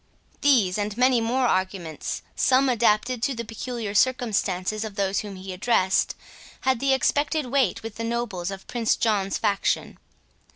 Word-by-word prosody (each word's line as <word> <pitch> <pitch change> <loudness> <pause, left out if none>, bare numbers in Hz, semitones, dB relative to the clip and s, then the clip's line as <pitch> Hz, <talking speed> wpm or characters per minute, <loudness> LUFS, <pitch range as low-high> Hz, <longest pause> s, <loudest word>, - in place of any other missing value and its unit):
These, 220 -10 +3
and 205 +1 -3
many 250 -1 +4
more 250 +3 +1
arguments, 185 -7 -2
some 265 +1 +3
adapted 235 0 +2
to 265 +2 0
the 235 0 -5
peculiar 225 -1 -5
circumstances 215 -4 +1
of 215 -2 -6
those 200 -1 0
whom 205 -2 -6
he 185 0 -7
addressed, 190 -1 +1 0.5
had 260 -2 +1
the 275 +1 +1
expected 290 +3 +1
weight 255 -6 +1
with 225 -1 -7
the 230 - -4
nobles 230 -6 -2
of 195 -1 -7
Prince 235 -2 0
John's 200 -4 0
faction. 200 -1 -1
225 Hz, 155 wpm, -25 LUFS, 195-250 Hz, 0.5 s, many